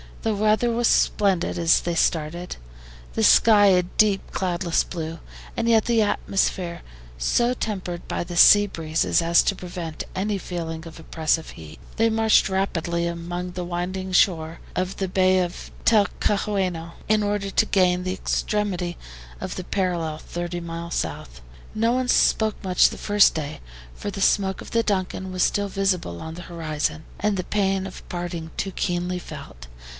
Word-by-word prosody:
The 220 Hz, -, +1 dB
weather 215 Hz, +3 st, +2 dB
was 235 Hz, 0 st, +1 dB
splendid 195 Hz, -4 st, +2 dB
when 170 Hz, -, -3 dB, 0.2 s
they 170 Hz, -1 st, -2 dB
started, 165 Hz, +2 st, -1 dB, 0.6 s
the 220 Hz, -, 0 dB
sky 210 Hz, -1 st, +6 dB
a 180 Hz, -2 st, +4 dB
deep 195 Hz, +2 st, +1 dB
cloudless 175 Hz, -2 st, 0 dB
blue, 165 Hz, -2 st, -6 dB, 0.4 s
and 230 Hz, -, 0 dB
yet 225 Hz, -2 st, +4 dB
the 230 Hz, -2 st, +3 dB
atmosphere 185 Hz, -4 st, -1 dB, 0.4 s
so 240 Hz, -, +2 dB
tempered 185 Hz, -7 st, -4 dB
by -, -, -2 dB
the 175 Hz, 0 st, -8 dB
sea 205 Hz, +4 st, +8 dB
breezes 165 Hz, -3 st, 0 dB
as 170 Hz, +1 st, +4 dB
to 195 Hz, -, 0 dB
prevent 175 Hz, -3 st, -6 dB
any 200 Hz, +1 st, -1 dB
feeling 165 Hz, -2 st, -5 dB
of 165 Hz, -, -11 dB
oppressive 160 Hz, 0 st, -1 dB
heat. 80 Hz, -1 st, -12 dB, 0.2 s
They 225 Hz, +1 st, +3 dB
marched 220 Hz, -2 st, +3 dB
rapidly 170 Hz, -3 st, -1 dB
along 175 Hz, +1 st, -4 dB
the 180 Hz, 0 st, -5 dB
winding 180 Hz, +2 st, -4 dB
shore 165 Hz, -3 st, +2 dB, 0.2 s
of 185 Hz, +1 st, -2 dB
the 190 Hz, -, -1 dB
bay 185 Hz, 0 st, +3 dB
of 175 Hz, -1 st, -4 dB
Talcahuano, 200 Hz, -5 st, +1 dB
in 215 Hz, 0 st, +3 dB
order 205 Hz, -1 st, -1 dB
to -, -, +3 dB
gain 180 Hz, -2 st, +2 dB
the 185 Hz, 0 st, -2 dB
extremity 190 Hz, -3 st, -2 dB, 0.4 s
of -, -, -5 dB
the 185 Hz, -, -5 dB
parallel, 175 Hz, -5 st, -1 dB
thirty 175 Hz, +1 st, -5 dB
miles 170 Hz, 0 st, -6 dB
south. -, -, -4 dB, 0.3 s
No 225 Hz, +2 st, +1 dB
one 255 Hz, 0 st, 0 dB
spoke 220 Hz, -3 st, +2 dB
much 185 Hz, -2 st, +4 dB
the -, -, -8 dB
first 205 Hz, -1 st, +4 dB
day, 150 Hz, -2 st, -4 dB, 0.4 s
for -, -, -5 dB
the 195 Hz, -, -6 dB
smoke 190 Hz, -1 st, +2 dB
of -, -, -10 dB
the 230 Hz, 0 st, +2 dB
DUNCAN 190 Hz, -2 st, -2 dB
was 185 Hz, -1 st, +1 dB
still 205 Hz, 0 st, +1 dB
visible 185 Hz, -, -1 dB
on 160 Hz, 0 st, -7 dB
the 175 Hz, -, -8 dB
horizon, 160 Hz, -2 st, -3 dB
and 210 Hz, -1 st, 0 dB
the 185 Hz, -, -2 dB
pain 195 Hz, -1 st, 0 dB
of 190 Hz, -, -11 dB
parting 175 Hz, -2 st, -5 dB
too 195 Hz, -, -2 dB
keenly 180 Hz, -1 st, -2 dB
felt. -, -, -10 dB
180 Hz, 165 wpm, -24 LUFS, 170-205 Hz, 0.6 s, sea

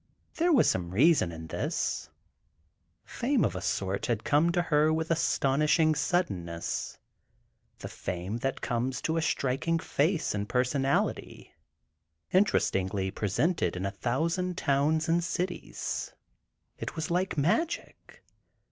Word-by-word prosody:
There 345 Hz, +2 st, +3 dB
was 275 Hz, -8 st, +5 dB
some 90 Hz, -2 st, 0 dB
reason 120 Hz, -, +4 dB
in 80 Hz, -1 st, -8 dB
this: 80 Hz, -, -2 dB, 1.0 s
fame 255 Hz, +1 st, +1 dB
of 95 Hz, -5 st, -2 dB
a 90 Hz, -, -4 dB
sort 95 Hz, +2 st, -1 dB
had 115 Hz, -3 st, -1 dB
come 155 Hz, +4 st, +3 dB
to 175 Hz, 0 st, +1 dB
her 155 Hz, -1 st, +3 dB
with 160 Hz, +1 st, -1 dB
astonishing 155 Hz, 0 st, +2 dB
suddenness—the 135 Hz, -, -2 dB, 0.9 s
fame 90 Hz, +5 st, -4 dB
that 135 Hz, +2 st, -3 dB
comes 125 Hz, +1 st, -1 dB
to 160 Hz, +1 st, 0 dB
a -, -, +1 dB
striking 150 Hz, +2 st, 0 dB
face 165 Hz, +1 st, 0 dB
and 105 Hz, 0 st, -3 dB
personality, 135 Hz, +2 st, -1 dB, 0.8 s
interestingly 95 Hz, -, +1 dB
presented 130 Hz, -, 0 dB
in 90 Hz, +1 st, -3 dB
a 100 Hz, -, -1 dB
thousand 165 Hz, -, -1 dB
towns 155 Hz, +3 st, +1 dB
and 170 Hz, +1 st, +2 dB
cities. 180 Hz, +2 st, -3 dB, 0.6 s
It -, -, -5 dB
was 160 Hz, 0 st, -3 dB
like 180 Hz, 0 st, 0 dB
magic. 215 Hz, -, -2 dB
150 Hz, 120 wpm, -29 LUFS, 105-170 Hz, 1.0 s, was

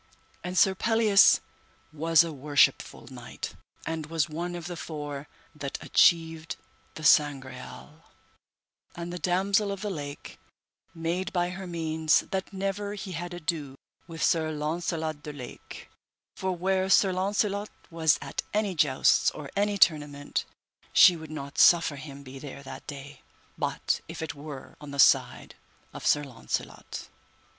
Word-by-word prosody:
And 180 Hz, +1 st, -4 dB
Sir 190 Hz, +3 st, +5 dB
Pelleas 220 Hz, 0 st, +5 dB, 0.5 s
was 165 Hz, +2 st, +4 dB
a 165 Hz, -2 st, -5 dB
worshipful 145 Hz, 0 st, +2 dB
knight, -, -, -7 dB, 0.3 s
and 160 Hz, -2 st, -3 dB
was 165 Hz, -1 st, 0 dB
one 170 Hz, +3 st, -4 dB
of 170 Hz, -2 st, -6 dB
the 175 Hz, +1 st, -5 dB
four 145 Hz, -3 st, -6 dB, 0.3 s
that 140 Hz, -2 st, -5 dB
achieved 165 Hz, -1 st, +3 dB, 0.4 s
the 155 Hz, -, -8 dB
Sangreal, 145 Hz, +1 st, +1 dB, 0.9 s
and 170 Hz, +1 st, -6 dB
the 180 Hz, -, -5 dB
Damosel 195 Hz, +3 st, +1 dB
of 200 Hz, -, -5 dB
the 210 Hz, -1 st, -2 dB
Lake 145 Hz, -4 st, -7 dB, 0.6 s
made 175 Hz, +4 st, -2 dB
by 175 Hz, -2 st, 0 dB
her 190 Hz, 0 st, -7 dB
means 160 Hz, -2 st, +1 dB
that 190 Hz, 0 st, -2 dB
never 200 Hz, +1 st, -3 dB
he 195 Hz, -1 st, -7 dB
had 175 Hz, +1 st, -5 dB
ado 160 Hz, -5 st, -3 dB, 0.3 s
with 165 Hz, -2 st, -5 dB
Sir 160 Hz, -1 st, +2 dB
Launcelot 155 Hz, 0 st, -2 dB
de 150 Hz, -, -7 dB
Lake, 125 Hz, -4 st, -10 dB, 0.5 s
for 190 Hz, 0 st, -2 dB
where 190 Hz, +1 st, 0 dB
Sir 190 Hz, 0 st, +5 dB
Launcelot 200 Hz, +2 st, 0 dB, 0.2 s
was 160 Hz, -2 st, +3 dB
at -, -, -4 dB
any 210 Hz, -2 st, +1 dB
jousts 145 Hz, -5 st, +3 dB
or 145 Hz, -2 st, -9 dB
any 205 Hz, 0 st, +1 dB
tournament, 145 Hz, -5 st, +1 dB, 0.5 s
she 180 Hz, -, +8 dB
would 160 Hz, -2 st, -9 dB
not 140 Hz, -2 st, -6 dB
suffer 165 Hz, -4 st, +6 dB
him 140 Hz, 0 st, -9 dB
be 135 Hz, 0 st, -10 dB
there 140 Hz, 0 st, -9 dB
that 135 Hz, 0 st, -10 dB
day, 140 Hz, -1 st, -9 dB, 0.3 s
but -, -, -1 dB
if -, -, -6 dB
it 155 Hz, -3 st, -4 dB
were 145 Hz, -2 st, -9 dB
on 150 Hz, -, -9 dB
the 140 Hz, -, -7 dB
side -, -, +4 dB, 0.4 s
of -, -, -4 dB
Sir 145 Hz, -, +4 dB
Launcelot. 125 Hz, -5 st, -5 dB
165 Hz, 145 wpm, -28 LUFS, 145-185 Hz, 0.9 s, she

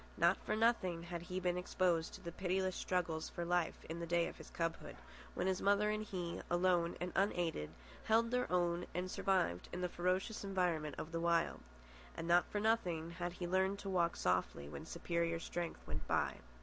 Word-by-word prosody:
Not 170 Hz, +3 st, +4 dB
for 215 Hz, -, 0 dB
nothing 200 Hz, -7 st, +2 dB
had 170 Hz, 0 st, -5 dB
he 180 Hz, +1 st, -3 dB
been 180 Hz, -1 st, 0 dB
exposed 180 Hz, -2 st, +1 dB
to -, -, -11 dB
the 170 Hz, -, -5 dB
pitiless 185 Hz, +1 st, 0 dB
struggles 165 Hz, -3 st, -1 dB
for 170 Hz, -, -4 dB
life 175 Hz, -1 st, 0 dB
in 165 Hz, +1 st, -4 dB
the 170 Hz, -, -4 dB
day 170 Hz, 0 st, +3 dB
of -, -, -7 dB
his -, -, -11 dB
cubhood, 165 Hz, -1 st, -3 dB, 0.4 s
when 180 Hz, -, 0 dB
his 190 Hz, 0 st, +1 dB
mother 205 Hz, +1 st, +4 dB
and 215 Hz, 0 st, -1 dB
he, 180 Hz, -5 st, -4 dB
alone 175 Hz, -1 st, +2 dB
and 180 Hz, 0 st, -2 dB
unaided, 175 Hz, -, +1 dB, 0.4 s
held 230 Hz, +1 st, +4 dB
their 250 Hz, -3 st, 0 dB
own 175 Hz, -1 st, +1 dB
and 180 Hz, +1 st, -2 dB
survived 185 Hz, -, +1 dB
in 180 Hz, -, -4 dB
the 180 Hz, -, 0 dB
ferocious 185 Hz, +5 st, 0 dB
environment 175 Hz, -6 st, 0 dB
of 160 Hz, -, -5 dB
the 165 Hz, -, -1 dB
Wild. 170 Hz, 0 st, +2 dB, 0.6 s
And 165 Hz, -, -3 dB
not 175 Hz, +1 st, +4 dB
for 205 Hz, -, -1 dB
nothing 180 Hz, -7 st, +1 dB
had 175 Hz, 0 st, -3 dB
he 180 Hz, -, -4 dB
learned 190 Hz, +2 st, +2 dB
to 200 Hz, -, -5 dB
walk 170 Hz, -2 st, +2 dB
softly 90 Hz, -5 st, 0 dB
when 70 Hz, -1 st, -7 dB
superior 170 Hz, -1 st, -1 dB
strength 170 Hz, 0 st, -4 dB
went 75 Hz, 0 st, -4 dB
by. -, -, +1 dB
175 Hz, 195 wpm, -37 LUFS, 170-190 Hz, 0.6 s, Not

